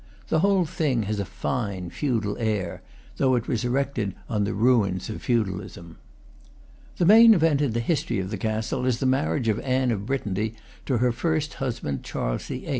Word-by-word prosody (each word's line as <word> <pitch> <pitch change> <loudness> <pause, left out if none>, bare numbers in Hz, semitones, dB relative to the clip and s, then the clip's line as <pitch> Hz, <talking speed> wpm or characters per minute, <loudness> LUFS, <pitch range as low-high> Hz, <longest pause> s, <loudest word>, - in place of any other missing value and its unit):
The 160 - +2
whole 195 0 +3
thing 145 -7 0
has 105 +1 -2
a 100 - -1
fine 100 -5 -3
feudal 115 -8 -1
air, 105 -6 -2 0.4
though 130 -2 +3
it 120 0 -2
was 120 -2 -1
erected 125 -5 -1
on 105 -4 0
the 105 - -2
rains 105 -4 +2
of - - -7
feudalism. 95 -7 -3 1.0
The 175 - +2
main 225 +4 +8
event 160 -4 +3
in 140 -6 +1
the 115 - 0
history 150 0 -1
of 95 0 -3
the 105 - -2
castle 110 +5 -1
is 125 -2 +2
the 130 - -2
marriage 115 -6 +1
of 110 0 +1
Anne 130 -1 +1
of 100 -2 -3
Brittany 110 -4 -2 0.3
to 130 - +1
her 125 +1 +2
first 155 +3 -1
husband, 115 - -3
Charles - - -3
VIII. - - -6
120 Hz, 185 wpm, -25 LUFS, 105-135 Hz, 1.0 s, main